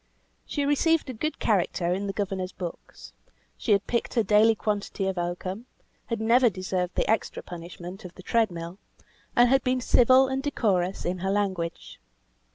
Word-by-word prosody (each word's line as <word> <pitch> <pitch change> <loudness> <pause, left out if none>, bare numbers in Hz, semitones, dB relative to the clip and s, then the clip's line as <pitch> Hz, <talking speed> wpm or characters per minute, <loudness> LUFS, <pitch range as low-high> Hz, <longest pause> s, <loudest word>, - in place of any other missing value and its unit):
She 290 -2 -1
received 290 0 +2
a - - -8
good 305 +7 -3
character 180 -4 +1
in 200 +2 -2
the - - -1
governor's 190 -2 -3
books; 175 -2 -8 0.4
she 225 - -3
had 200 -1 +3
picked 235 - -2
her 230 - +3
daily 215 +2 +5
quantity 205 -2 -2
of 190 -2 -1
oakum, 185 +6 -4 0.4
had 230 -2 -2
never 235 +3 +4
deserved 185 -2 -3
the - - 0
extra 220 -1 -1
punishment 175 +2 -9
of 180 -1 -10
the 185 - -12
tread 225 +2 +2
mill, 170 +2 -7 0.6
and 240 +1 +6
had 270 +1 +3
been 255 0 +1
civil 255 +2 +5
and 265 0 -2
decorous 195 -10 0
in 180 +1 -2
her 190 +2 -2
language. 190 -4 -2
200 Hz, 170 wpm, -26 LUFS, 185-240 Hz, 0.6 s, and